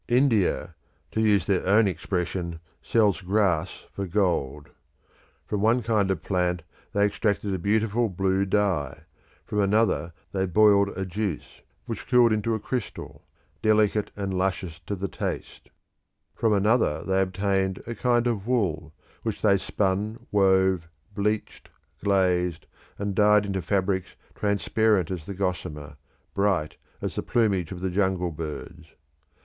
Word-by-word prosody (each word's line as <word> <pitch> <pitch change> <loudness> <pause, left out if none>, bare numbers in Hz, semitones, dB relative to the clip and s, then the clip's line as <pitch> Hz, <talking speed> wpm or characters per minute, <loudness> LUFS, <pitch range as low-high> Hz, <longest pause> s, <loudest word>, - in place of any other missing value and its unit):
India, 120 -5 +2 0.4
to 110 - 0
use 105 -5 +3
their 95 -3 +1
own 105 +2 +5
expression, 90 -1 -3 0.2
sells 105 -4 +2
grass 95 -4 0
for 100 -1 -4
gold. 85 -7 0 0.8
From 105 - -2
one 115 +3 +3
kind 105 -3 +1
of 90 -4 -1
plant 90 -3 0 0.3
they 100 0 +3
extracted 100 -1 0
a 95 - -2
beautiful 110 +4 +1
blue 95 +1 +1
dye: 90 -8 0 0.4
from 105 - -2
another 100 -4 +2 0.2
they 95 -1 0
boiled 100 +1 +5
a 95 - -2
juice, 95 -2 -4 0.2
which - - -6
cooled 120 -2 +5
into 110 +1 0
a - - -3
crystal, 125 -1 -5 0.4
delicate 110 -1 +2
and 100 -2 -3
luscious 90 -3 -2
to 100 - -2
the 100 +1 -3
taste; - - -5 0.6
from 115 -2 +1
another 105 -5 +2
they 95 0 +1
obtained 95 0 0
a 115 - -4
kind 120 0 +1
of 115 -4 -1
wool, 80 - -1 0.3
which 110 -3 -4
they 100 -2 +5
spun, 100 +3 -1
wove, 95 -3 +3 0.3
bleached, 105 +1 -2 0.3
glazed, 90 -4 +1 0.3
and 100 0 -2
dyed 105 +1 +4
into 95 -2 -2
fabrics 95 +1 -1 0.2
transparent 100 -2 +1
as 85 -5 -5
the 100 - -5
gossamer, 80 -6 -3 0.4
bright 100 -6 0 0.3
as - - -2
the - - -2
plumage 100 -8 +1
of 90 -1 -6
the 95 -1 -1
jungle 95 -2 0
birds. 75 -1 -8
100 Hz, 140 wpm, -26 LUFS, 90-105 Hz, 0.8 s, own